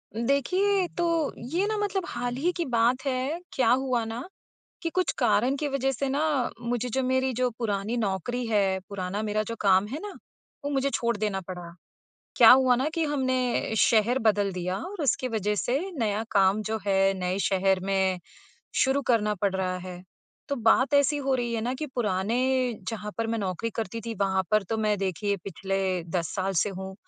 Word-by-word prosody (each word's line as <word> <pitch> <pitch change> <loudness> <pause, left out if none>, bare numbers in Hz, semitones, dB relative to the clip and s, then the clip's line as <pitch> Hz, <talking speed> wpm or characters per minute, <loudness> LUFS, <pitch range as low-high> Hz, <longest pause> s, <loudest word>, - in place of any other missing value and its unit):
देखिए 365 - +1
तो, 335 -3 +1
ये 325 - -1
ना 430 0 -1
मतलब 405 -2 -1
हाल 245 0 -3
ही 320 +8 +1
की 345 - 0
बात 245 +1 +2
है। 270 +4 -1
क्या 250 -4 +2
हुआ 255 -2 +1
ना 225 +3 -5 0.6
कि 335 - -1
कुछ 370 0 +1
कारण 250 +5 +3
की 295 +1 -2
वज़ह 270 -1 0
से 275 +1 -2
ना 285 -1 0
मुझे 240 0 -2
जो 265 +3 -1
मेरी 260 0 +1
जो 250 +1 +1
पुरानी 215 0 -1
नौकरी 225 +3 -2
है, 200 -4 +2
पुराना 200 +1 -3
मेरा 215 0 0
जो 230 - -4
काम 195 -1 +4
है 270 +7 -4
ना, 415 -1 -6 0.5
वो 285 - -1
मुझे 275 -1 +1
छोड़ 235 -1 0
देना 205 -2 -1
पड़ा। 175 -2 -7 0.6
क्या - - +9
हुआ 255 -1 +6
ना 265 +4 0
कि 330 -2 +1
हमने 260 -5 0
शहर 230 +4 +4
बदल 205 -4 +2
दिया, 180 +1 -2
और 380 -2 -6
उसके 255 -1 +1
वज़ह 210 -3 -1
से 245 +6 0 0.2
नया 215 -2 0
काम 200 +1 +3
जो 220 +1 -2
है 195 0 +3
नए 180 +1 -1
शहर 190 0 +2
में 190 -1 +1 0.7
शुरू 270 +1 +1
करना 210 -2 +2
पड़ 195 0 -1
रहा 185 -1 -1
है। 180 0 -8 0.5
तो 280 - -1
बात 255 +4 +3
ऐसी 285 +1 +4
हो 275 -2 0
रही 240 -2 -1
है 225 - -1
ना 245 +3 -2
कि 305 +4 -4
पुराने, 245 +4 +1
जहाँ 210 -2 -5
पर 230 - 0
मैं 230 0 -1
नौकरी 200 +3 -2
करती 225 0 -3
थी, 230 - -3
वहाँ 190 -2 +1
पर 215 -1 +4
तो 210 +4 -3
मैं 210 -1 +1
देखिए 200 +2 -1
पिछले 195 -1 -2
10 170 0 -3
साल 190 0 -1
से - - -2
हूँ, 190 0 -7
230 Hz, 195 wpm, -27 LUFS, 195-265 Hz, 0.7 s, क्या